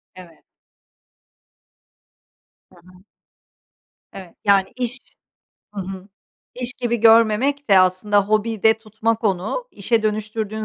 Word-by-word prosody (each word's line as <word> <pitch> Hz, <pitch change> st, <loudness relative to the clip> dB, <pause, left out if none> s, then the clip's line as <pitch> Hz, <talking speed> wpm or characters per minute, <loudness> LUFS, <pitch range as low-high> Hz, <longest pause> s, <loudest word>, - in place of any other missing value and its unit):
Evet. 175 Hz, -3 st, -15 dB, 2.3 s
Hı -, -, -21 dB
hı. 180 Hz, +2 st, -20 dB, 1.1 s
Evet. 185 Hz, -3 st, -12 dB
Yani 200 Hz, 0 st, +2 dB
iş 250 Hz, +1 st, -4 dB, 0.8 s
Hı 200 Hz, -, -4 dB
hı. 190 Hz, +1 st, -8 dB, 0.5 s
İş 245 Hz, 0 st, -5 dB
gibi 240 Hz, -2 st, -2 dB
görmemek 230 Hz, +4 st, +3 dB
de 195 Hz, -, +7 dB
aslında, 185 Hz, +3 st, +2 dB
hobi 215 Hz, 0 st, -1 dB
de 220 Hz, 0 st, +4 dB
tutmak 225 Hz, +1 st, -3 dB
onu. 200 Hz, -, -1 dB
İşe 220 Hz, +3 st, -1 dB
dönüştürdüğün 215 Hz, 0 st, -3 dB
215 Hz, 105 wpm, -20 LUFS, 195-230 Hz, 2.3 s, de